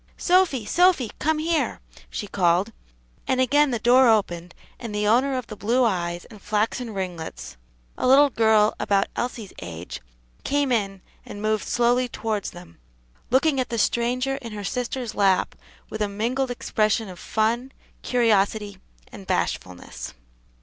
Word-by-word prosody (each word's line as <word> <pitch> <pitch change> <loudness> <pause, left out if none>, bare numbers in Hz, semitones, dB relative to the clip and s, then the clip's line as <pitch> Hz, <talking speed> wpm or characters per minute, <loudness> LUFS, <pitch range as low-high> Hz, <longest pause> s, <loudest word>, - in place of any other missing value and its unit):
"Sophy! 350 - +2
Sophy, 345 - +3
come 315 +2 +1
here!" 320 +1 0 0.3
she - - -4
called, 185 +2 +1 0.6
and 260 - +1
again 285 +3 +4
the 240 - 0
door 245 +3 +5
opened 175 -5 0 0.2
and 230 -4 -6
the 210 0 0
owner 255 +5 +3
of 255 - -4
the 215 - -9
blue 235 +5 +1
eyes 175 -5 -1
and 210 -3 -14
flaxen 220 +3 -1
ringlets 180 - -6 0.4
a - - +1
little 280 +2 +6
girl 220 -2 +4
about 200 -1 +2
Elsie's 235 -4 -4
age, 85 0 -7 0.4
came 285 -1 0
in, 195 -5 -1 0.2
and 205 - -9
moved 215 0 -1
slowly 245 +1 +2
towards 220 -4 -3
them, 175 - -14 0.5
looking 270 +2 +3
at 255 - -1
the 235 - -2
stranger 250 +4 0
in 235 -5 -8
her 205 -1 -6
sister's 245 +1 -3
lap 195 -2 +2 0.4
with 215 - -5
a 210 - +1
mingled 240 +6 -1
expression 220 -2 0
of 180 -2 -10
fun, 235 +4 -1 0.3
curiosity, 210 -4 +1 0.3
and 195 - -11
bashfulness. 90 - -3
225 Hz, 150 wpm, -24 LUFS, 200-255 Hz, 0.6 s, little